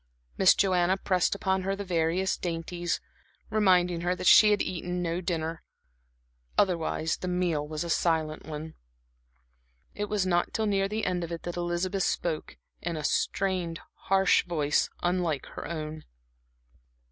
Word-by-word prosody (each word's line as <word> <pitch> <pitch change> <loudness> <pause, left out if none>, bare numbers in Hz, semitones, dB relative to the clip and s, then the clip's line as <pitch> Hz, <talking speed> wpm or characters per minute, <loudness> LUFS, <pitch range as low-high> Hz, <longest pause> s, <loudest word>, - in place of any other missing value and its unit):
Miss 190 - +6
Joanna 185 -1 +2
pressed 185 0 +1
upon 190 -1 0
her 195 +1 -1
the 200 - -5
various 175 +2 +1
dainties, 175 0 -3 0.5
reminding 180 -5 +3
her 175 +1 0
that 180 - -6
she 210 +3 +8
had 205 -1 +3
eaten 180 0 -3
no 170 +1 -1
dinner; 165 -2 -3 1.0
otherwise 165 -3 +1
the 185 - -5
meal 175 -5 0
was 155 +1 -3
a 170 - -5
silent 160 -3 0
one. 155 +1 -6 1.2
It 205 - -3
was 205 -2 0
not 175 -1 +1
till 220 - 0
near 195 -2 +1
the 215 +2 -2
end 180 -1 -1
of 170 - -6
it 170 - -5
that 175 - -4
Elizabeth 175 +2 -1
spoke 165 -3 -2 0.2
in 170 -1 -3
a 155 - -4
strained 180 0 0
harsh 195 0 +3
voice 150 -4 +1
unlike 175 -5 0
her - - -7
own. 155 -1 -5
175 Hz, 150 wpm, -28 LUFS, 165-190 Hz, 1.2 s, she